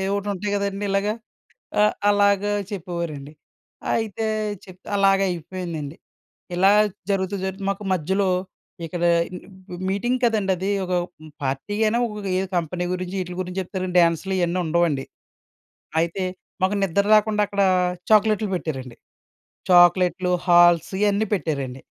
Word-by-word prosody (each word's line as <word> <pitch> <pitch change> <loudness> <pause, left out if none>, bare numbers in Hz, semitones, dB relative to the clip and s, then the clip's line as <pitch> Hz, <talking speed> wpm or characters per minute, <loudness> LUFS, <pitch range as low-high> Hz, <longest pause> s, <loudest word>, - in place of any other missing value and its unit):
ఒటి 200 0 -3
ఉంటాయి 200 +2 -3
కదండీ 200 0 -2
ఇలాగ. 195 +1 +1 0.7
ఆహ్, 210 - +4 0.2
అలాగ 200 -1 +3 0.3
చెప్పేవారండి. 170 -6 -5 0.6
అయితే 225 -1 -2 0.4
చెప్త్ 185 0 -15
అలాగయిపోయిందండి. 180 -5 0 0.6
ఇలా 190 +3 +5 0.4
జరుగుతూ 195 0 0
జరుగుతూ 190 +1 -4
మాకు 195 +1 -3
మధ్యలో 190 +3 0 0.6
ఇక్కడ 170 +1 -4 0.3
మ్ 185 -1 -11
మీటింగ్ 240 +6 0
కదండీ 215 -4 +1
అది. 190 +3 -2 0.2
ఒక 180 - -3 0.5
పార్టీ 135 +9 -2
అయినా 225 +2 +2
ఒఏ 205 -4 -4 0.2
కంపెనీ 175 +1 -1
గురించి 185 +1 -4
వీట్ల 180 -1 -5
గురించి 180 +1 -4
చెప్తారు, 185 0 -4
డాన్స్‌లు 170 +3 +2
ఇయన్నీ 175 +1 0
ఉండవండి. 160 -4 +1 1.0
అయితే 170 +3 -2 0.4
మాకు 190 +2 +2
నిద్ర 195 +2 +1
రాకుండా 210 0 +2
అక్కడ 200 0 -1 0.5
చాక్లెట్లు 215 -1 +4
పెట్టారండి. 130 -8 -5 0.7
చాక్లెట్లు, 180 +1 +5 0.2
హాల్స్ 175 -1 +5
ఇయన్నీ 205 +1 +2
పెట్టారండి. 140 -8 -2
185 Hz, 115 wpm, -23 LUFS, 175-200 Hz, 1.0 s, ఇలా